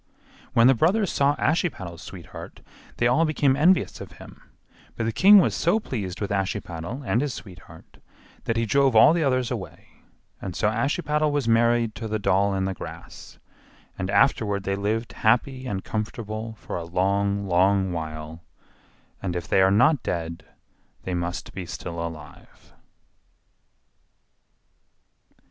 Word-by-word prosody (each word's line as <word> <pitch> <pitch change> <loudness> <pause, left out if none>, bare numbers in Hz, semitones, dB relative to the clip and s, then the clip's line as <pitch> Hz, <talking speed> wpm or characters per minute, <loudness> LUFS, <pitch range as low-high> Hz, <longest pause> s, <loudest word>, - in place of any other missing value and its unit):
When 115 - +5
the 130 - +7
brothers 185 - +2
saw 140 +1 +2
Ashiepattle's 100 - -1
sweetheart 90 -4 -10 0.4
they 120 - +1
all 125 +7 +4
became 145 -4 +2
envious 175 +6 +2
of - - -9
him, - - -14 0.5
but 115 - -2
the 115 - 0
king 200 - +7
was 190 - +4
so 175 +7 +2
pleased 100 - -5
with 100 - -3
Ashiepattle 95 - -3
and 120 - +1
his 140 -4 -2
sweetheart 95 -5 -13 0.5
that 115 - -1
he 115 - +1
drove 135 +3 +2
all 110 +8 +7
the 170 -1 +1
others 130 -3 0
away, 110 -7 -7 0.5
and 95 -3 -6
so 105 - +1
Ashiepattle 150 +6 0
was 145 -4 -1
married 115 0 +3
to 115 - -6
the 110 0 -1
doll 100 -1 +1
in 95 0 -1
the 95 - -2
grass; - - -10 0.6
and 95 - -4
afterward 100 -1 +2
they 100 0 -1
lived 110 +4 -2
happy 130 +4 +1
and 95 -5 -3
comfortable 110 0 -5
for - - -6
a 85 - -4
long, 100 +3 0
long 95 +1 +2
while; 80 0 -6 0.8
and 90 -3 -3
if 85 -2 -4
they 95 - +3
are 95 - +5
not 125 +8 +4
dead, 85 -1 -4 0.6
they 95 - -4
must 90 +2 -4
be 95 -3 -6
still 85 -2 -6
alive. 80 -3 -11
110 Hz, 150 wpm, -24 LUFS, 95-130 Hz, 0.8 s, the